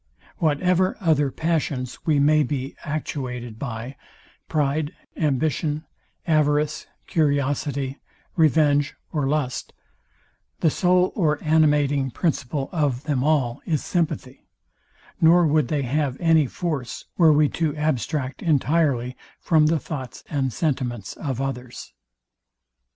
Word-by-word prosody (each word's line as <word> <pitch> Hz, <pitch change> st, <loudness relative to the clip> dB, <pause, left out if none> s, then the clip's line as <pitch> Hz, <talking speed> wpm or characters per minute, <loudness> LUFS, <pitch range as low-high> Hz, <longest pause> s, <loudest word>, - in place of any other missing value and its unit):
Whatever 180 Hz, +4 st, +2 dB
other 155 Hz, -7 st, +2 dB
passions 150 Hz, -5 st, -2 dB
we 155 Hz, -2 st, +4 dB
may 150 Hz, +2 st, +4 dB
be 140 Hz, -2 st, -3 dB
actuated 125 Hz, -7 st, -4 dB
by; 120 Hz, +1 st, -5 dB, 0.5 s
pride, 150 Hz, 0 st, 0 dB, 0.2 s
ambition, 150 Hz, +1 st, 0 dB, 0.4 s
avarice, 150 Hz, -1 st, +1 dB, 0.2 s
curiosity, 140 Hz, -2 st, 0 dB, 0.4 s
revenge 150 Hz, -3 st, +3 dB, 0.2 s
or 145 Hz, -4 st, 0 dB
lust; 140 Hz, -3 st, -2 dB, 0.9 s
the 160 Hz, -, +4 dB
soul 180 Hz, +2 st, +3 dB
or 155 Hz, -6 st, +1 dB
animating 150 Hz, -3 st, +3 dB
principle 140 Hz, -1 st, -1 dB
of 145 Hz, -6 st, 0 dB
them 145 Hz, -4 st, 0 dB
all 140 Hz, -4 st, +1 dB
is 155 Hz, -4 st, 0 dB
sympathy; 155 Hz, -6 st, -2 dB, 0.7 s
nor 170 Hz, +2 st, +6 dB
would 155 Hz, -3 st, +2 dB
they 145 Hz, 0 st, -1 dB
have 135 Hz, 0 st, -1 dB
any 160 Hz, -4 st, +4 dB
force, 145 Hz, -6 st, -4 dB
were 165 Hz, -3 st, +6 dB
we 150 Hz, 0 st, +4 dB
to 160 Hz, -3 st, -1 dB
abstract 150 Hz, -2 st, -2 dB
entirely 140 Hz, -5 st, +1 dB, 0.2 s
from 155 Hz, -2 st, +3 dB
the 165 Hz, +1 st, +2 dB
thoughts 130 Hz, -6 st, -7 dB
and 135 Hz, -3 st, 0 dB
sentiments 125 Hz, -, -2 dB
of 135 Hz, -5 st, -4 dB
others. 130 Hz, -2 st, -5 dB
150 Hz, 110 wpm, -23 LUFS, 135-155 Hz, 0.9 s, nor